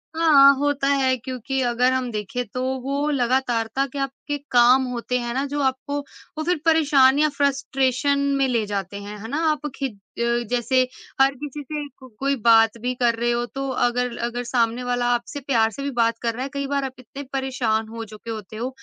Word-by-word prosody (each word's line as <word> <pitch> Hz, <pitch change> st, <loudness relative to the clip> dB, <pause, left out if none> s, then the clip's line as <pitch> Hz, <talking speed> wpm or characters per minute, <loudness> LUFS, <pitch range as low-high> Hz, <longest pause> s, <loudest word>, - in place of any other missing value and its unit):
हाँ, 290 Hz, -4 st, +7 dB
होता 285 Hz, -1 st, 0 dB
है, 270 Hz, -2 st, +3 dB
क्योंकि 255 Hz, +2 st, -4 dB
अगर 245 Hz, +1 st, +2 dB
हम 255 Hz, -1 st, -1 dB
देखें, 215 Hz, +4 st, -3 dB
तो 250 Hz, +5 st, -5 dB, 0.2 s
वो 280 Hz, +3 st, -1 dB
लगातारता 250 Hz, -1 st, 0 dB
के 280 Hz, -, -4 dB
आपके 275 Hz, +2 st, -3 dB
काम 245 Hz, +2 st, +6 dB
होते 250 Hz, +1 st, -2 dB
हैं 240 Hz, -1 st, -3 dB
ना, 270 Hz, +3 st, -1 dB
जो 290 Hz, +1 st, -3 dB
आपको, 265 Hz, +2 st, -1 dB, 0.4 s
वो 310 Hz, -, -2 dB
फिर 345 Hz, -2 st, 0 dB
परेशान 290 Hz, -4 st, +5 dB
या 305 Hz, 0 st, +4 dB
फ्रस्ट्रेशन 275 Hz, -1 st, +1 dB, 0.2 s
में 270 Hz, -, +2 dB
ले 235 Hz, -4 st, 0 dB
जाते 200 Hz, -1 st, -4 dB
हैं। 205 Hz, +1 st, -8 dB
है 225 Hz, -, -7 dB
ना? 285 Hz, +6 st, -3 dB
आप 300 Hz, 0 st, -3 dB
खिद 245 Hz, -8 st, -4 dB, 0.2 s
अ, 235 Hz, -, +1 dB, 0.3 s
जैसे 245 Hz, +1 st, +2 dB, 0.4 s
हर 270 Hz, +1 st, +5 dB
किसी 295 Hz, +2 st, -7 dB
से 295 Hz, +1 st, -5 dB
को 260 Hz, -, -12 dB
कोई 275 Hz, +1 st, +1 dB
बात 225 Hz, -1 st, +5 dB
भी 250 Hz, +1 st, -1 dB
कर 240 Hz, -2 st, +2 dB
रहे 240 Hz, +1 st, 0 dB
हो, 240 Hz, 0 st, 0 dB
तो 270 Hz, +2 st, -5 dB
अगर 245 Hz, -1 st, 0 dB
अगर 245 Hz, +1 st, -4 dB
सामने 235 Hz, 0 st, 0 dB
वाला 245 Hz, 0 st, -1 dB
आपसे 240 Hz, +4 st, -3 dB
प्यार 225 Hz, -5 st, +3 dB
से 275 Hz, -, -7 dB
भी 280 Hz, -, -2 dB
बात 230 Hz, -1 st, +2 dB
कर 230 Hz, -1 st, 0 dB
रहा 250 Hz, +3 st, -4 dB
है, 275 Hz, -, -4 dB
कई 280 Hz, -1 st, -2 dB
बार 280 Hz, -, +1 dB
आप 260 Hz, -, -5 dB
इतने 270 Hz, +3 st, -9 dB
परेशान 250 Hz, -5 st, -1 dB
हो 230 Hz, +1 st, -7 dB
चुके 215 Hz, +2 st, -10 dB
होते 215 Hz, -1 st, -7 dB
हो, 240 Hz, +3 st, -2 dB
255 Hz, 205 wpm, -23 LUFS, 235-275 Hz, 0.4 s, हाँ